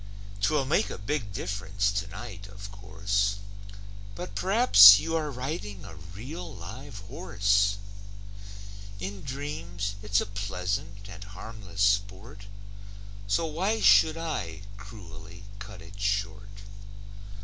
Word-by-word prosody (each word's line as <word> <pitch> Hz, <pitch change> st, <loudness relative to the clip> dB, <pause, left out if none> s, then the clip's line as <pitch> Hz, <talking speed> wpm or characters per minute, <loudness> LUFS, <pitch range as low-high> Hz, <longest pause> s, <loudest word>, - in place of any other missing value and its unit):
'Twill 145 Hz, +5 st, +2 dB
make 130 Hz, -7 st, +2 dB
a -, -, -5 dB
big 105 Hz, +2 st, -3 dB
diff'rence 100 Hz, +1 st, -1 dB
tonight, 100 Hz, +1 st, -6 dB
of 100 Hz, 0 st, -10 dB
course, 100 Hz, 0 st, -1 dB, 0.8 s
But 180 Hz, -, -7 dB
p'rhaps 185 Hz, -, +9 dB
you 165 Hz, +5 st, -2 dB
are 155 Hz, -2 st, 0 dB
riding 125 Hz, -, -5 dB
a 95 Hz, -, -10 dB
real 115 Hz, -, -8 dB
live 110 Hz, +6 st, -9 dB
horse; 100 Hz, 0 st, +1 dB, 1.2 s
In 95 Hz, +1 st, -5 dB
dreams, 130 Hz, -, -4 dB
it's 105 Hz, -1 st, +2 dB
a -, -, -1 dB
pleasant 100 Hz, 0 st, -4 dB
and 100 Hz, 0 st, -9 dB
harmless 100 Hz, 0 st, -8 dB
sport, 100 Hz, +1 st, 0 dB, 0.8 s
So 100 Hz, +11 st, +1 dB
why 185 Hz, +8 st, 0 dB
should 160 Hz, -5 st, +6 dB
I 155 Hz, -12 st, -4 dB
cruelly 100 Hz, -2 st, -11 dB, 0.2 s
cut 105 Hz, -4 st, -10 dB
it 100 Hz, 0 st, -13 dB
short? 100 Hz, 0 st, -2 dB
100 Hz, 115 wpm, -28 LUFS, 100-125 Hz, 1.2 s, p'rhaps